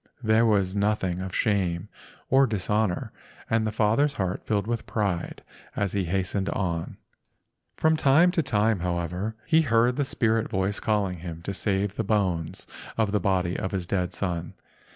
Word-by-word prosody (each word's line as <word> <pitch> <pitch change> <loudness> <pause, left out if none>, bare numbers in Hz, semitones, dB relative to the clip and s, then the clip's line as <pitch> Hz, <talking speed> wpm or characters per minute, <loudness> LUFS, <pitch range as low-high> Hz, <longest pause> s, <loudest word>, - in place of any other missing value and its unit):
There 110 +1 +4
was 100 -4 +2
nothing 100 -3 0
of 95 -1 -5
shame 95 -6 0 0.4
or 135 +1 +5
dishonor—and 110 +1 -2
the - - -1
father's 115 +7 +2
heart 95 -4 -2
filled 100 -2 0
with 115 0 -3
pride 100 -6 -2 0.3
as 100 -2 -1
he 100 -2 0
hastened 95 +2 -1
on. 85 -4 -2 0.8
From 160 0 +3
time 155 +4 +5
to 175 -2 +1
time, 110 - +1
however, 90 +4 -2
he 165 -1 +4
heard 120 -2 +2
the 145 - +2
spirit 115 -4 0
voice 95 -1 -1
calling 100 -5 0
him 85 -1 -7
to 100 - -3
save 100 0 -1
the 115 - -2
bones 95 -6 -1 0.3
of 110 -3 +1
the 105 - +2
body 90 -2 0
of 95 - -3
his 95 -3 -2
dead 90 -1 -1
son. 85 -3 -3
100 Hz, 160 wpm, -26 LUFS, 90-115 Hz, 0.8 s, or